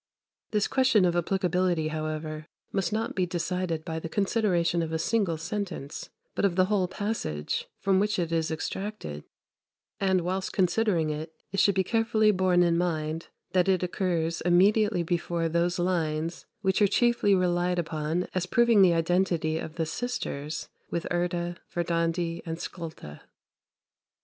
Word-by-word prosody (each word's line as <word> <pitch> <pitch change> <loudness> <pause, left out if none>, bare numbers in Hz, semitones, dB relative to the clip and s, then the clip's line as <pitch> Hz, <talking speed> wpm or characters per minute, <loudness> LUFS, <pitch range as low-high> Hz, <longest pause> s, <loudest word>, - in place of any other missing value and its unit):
This 210 -1 +1
question 260 -7 +4
of 175 -1 +2
applicability, 180 -2 +1
however, 155 0 -4 0.2
must 190 -4 0
not 220 +2 -1
be 185 -2 0
decided 175 -2 -2
by 160 -2 -3
the 165 - -6
consideration 185 -4 +1
of 160 -1 -3
a 160 - 0
single 195 -2 +1
sentence, 175 -4 -5 0.2
but - - -2
of 195 -4 +2
the 185 0 +4
whole 195 -2 +1
passage 185 - -3
from 190 -1 +2
which 210 +2 +1
it 170 -2 -1
is 165 -1 +1
extracted; 160 - -5 0.7
and, 190 -2 +2
whilst 185 +2 -2
considering 180 -4 +2
it, 155 +1 -6 0.2
it 195 - -1
should 200 - +4
be 190 - +3
carefully 220 +1 +3
borne 185 -2 +3
in 170 -1 +2
mind 160 -2 -2 0.2
that 185 0 +3
it 185 -1 +2
occurs 170 -3 -1
immediately 195 +2 +4
before 170 0 -1
those 170 +2 +1
lines 165 -2 -1
which 190 +1 +1
are 205 - +6
chiefly 235 -1 +3
relied 180 -1 +1
upon 160 +1 -1
as 185 -1 -1
proving 235 -1 +4
the 180 -3 +6
identity 165 -2 +1
of 160 - -7
the 165 -2 -1
sisters 160 -7 -4 0.2
with 170 - -2
Urda, 175 0 -1
Verdandi, 170 0 -1
and 165 -1 -5
Skulda. 160 - -7
175 Hz, 150 wpm, -28 LUFS, 165-195 Hz, 0.7 s, are